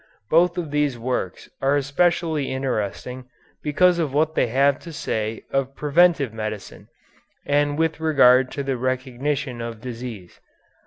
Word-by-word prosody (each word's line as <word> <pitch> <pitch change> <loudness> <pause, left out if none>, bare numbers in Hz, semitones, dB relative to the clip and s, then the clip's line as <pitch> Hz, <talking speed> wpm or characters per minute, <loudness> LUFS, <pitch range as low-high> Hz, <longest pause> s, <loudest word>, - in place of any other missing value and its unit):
Both 175 +3 +4
of 165 -5 -3
these 145 -4 0
works 120 -6 -3
are 135 +1 +3
especially 155 +1 +1
interesting 125 -1 -3 0.4
because 175 +4 +3
of 145 -5 -1
what 155 +1 +2
they - - +2
have 140 +4 +2
to 170 - -10
say 110 -7 -3
of 135 0 -1
preventive 150 -4 +3
medicine 110 -2 -6 0.6
and 145 0 +1
with 160 0 0
regard 130 -5 +5
to 140 - -3
the 135 -2 -2
recognition 130 +1 -2
of 115 -1 -6
disease. 115 -6 -8
135 Hz, 140 wpm, -23 LUFS, 125-150 Hz, 0.6 s, regard